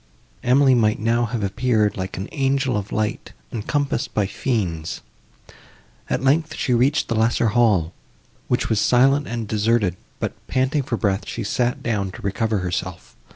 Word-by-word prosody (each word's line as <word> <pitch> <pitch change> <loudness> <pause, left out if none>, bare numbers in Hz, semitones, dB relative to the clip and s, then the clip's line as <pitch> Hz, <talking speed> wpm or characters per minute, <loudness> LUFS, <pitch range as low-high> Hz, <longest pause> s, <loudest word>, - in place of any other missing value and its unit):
Emily 130 +2 +4
might 110 -3 +3
now 115 +2 +1
have 115 -2 -3
appeared, 105 +1 +1
like 95 0 -5
an 95 - -4
angel 135 -3 +1
of 105 -1 -3
light, 110 -1 -2 0.2
encompassed 135 +3 -2
by 105 - +2
fiends. 95 -8 -2 1.1
At - - -1
length, 155 +4 +2
she 125 - 0
reached 130 +5 +2
the - - -1
lesser 115 +1 +2
hall, 105 -8 +2 0.5
which - - 0
was 110 - +1
silent 135 +5 +3
and 115 -2 -4
deserted, 105 -3 +1 0.2
but, - - -2
panting 130 +3 +1
for 120 -3 -3
breath, 95 0 -1
she 115 - -4
sat 120 +4 -1
down 105 -5 -1
to - - -10
recover 110 +2 0
herself. 90 0 -4
115 Hz, 155 wpm, -22 LUFS, 105-130 Hz, 1.1 s, Emily